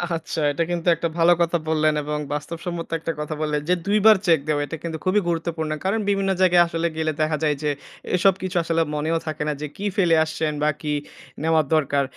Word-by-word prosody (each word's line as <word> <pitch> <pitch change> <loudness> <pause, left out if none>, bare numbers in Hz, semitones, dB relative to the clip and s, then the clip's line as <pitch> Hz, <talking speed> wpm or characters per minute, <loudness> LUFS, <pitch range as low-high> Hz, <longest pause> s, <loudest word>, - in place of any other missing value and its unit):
আচ্ছা। 165 - -4
এটা 165 +4 0
কিন্তু 175 0 -3
একটা 165 +1 -2
ভালো 170 +1 +5
কথা 170 0 +2
বললেন 155 -1 +2
এবং 150 +1 -3
বাস্তবসম্মত 165 +3 -5
একটা 165 - -3
কথা 150 +1 -3
বললেন। 150 -1 0
যে 180 - +5
২ 205 +1 +2
বার 220 -2 +8
চেক 165 -3 +5
দেওয়া 145 -1 +1
এটা 165 - -6
কিন্তু 165 -1 -4
খুবই 185 +3 +3
গুরুত্বপূর্ণ। 165 -2 -2
কারণ 210 +4 +1
বিভিন্ন 195 -1 +1
জায়গায় 175 -2 +6
আসলে 170 0 -1
গেলে 155 -1 0
দেখা 155 0 +1
যায় 150 -1 +2
যে, 150 - +1 0.5
এসব 195 +2 +4
কিছু 185 -1 -2
আসলে 165 0 +1
মনেও 155 +2 0
থাকে 155 -1 -3
না 150 - 0
যে 150 - -3
কী 205 - -5
ফেলে 175 -5 +4
আসছেন? 155 0 -2
বা 150 - +3
কি 150 -1 -2 0.5
নেওয়া 160 -1 +3
দরকার? 140 -2 +2
165 Hz, 210 wpm, -23 LUFS, 155-175 Hz, 0.5 s, বার